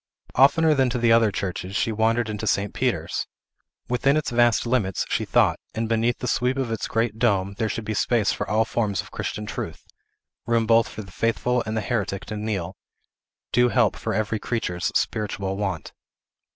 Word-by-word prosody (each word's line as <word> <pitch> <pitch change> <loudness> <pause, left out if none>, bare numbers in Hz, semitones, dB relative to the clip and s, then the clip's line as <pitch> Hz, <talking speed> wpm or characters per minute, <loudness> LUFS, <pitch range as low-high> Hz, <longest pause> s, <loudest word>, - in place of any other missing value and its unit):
Oftener 155 +4 +5
than 135 -3 +2
to 125 - -2
the 120 -1 +3
other 115 -2 +5
churches, 95 -1 -4
she 115 - +1
wandered 115 +2 +1
into 110 0 -4
St. 100 0 0
Peter's. - - -1 0.6
Within 135 +4 +2
its 155 - -1
vast 120 -1 +3
limits, 115 -7 0
she - - 0
thought, - - +3 0.2
and 115 0 -1
beneath 115 +1 +1
the 125 - -4
sweep 125 +2 +1
of 130 -4 -1
its 115 - -2
great 115 -1 -1
dome, 100 -5 +2
there 110 -2 0
should 115 - -4
be 110 - -2
space 110 0 +2
for - - -4
all 110 +1 +2
forms 105 -4 -1
of - - -15
Christian 105 - -4
truth; - - -6 0.6
room 115 -1 +2
both 115 0 +4
for 110 - -7
the 95 - -13
faithful 120 +4 0
and 110 +1 -2
the - - 0
heretic 105 -4 -2
to 110 - -5
kneel; 100 -4 -3 0.8
due 125 +1 +4
help - - +2
for - - -3
every 110 0 -1
creature's 90 -8 -3
spiritual 100 -2 -2
want. 95 -5 -3
110 Hz, 190 wpm, -24 LUFS, 105-120 Hz, 0.8 s, Oftener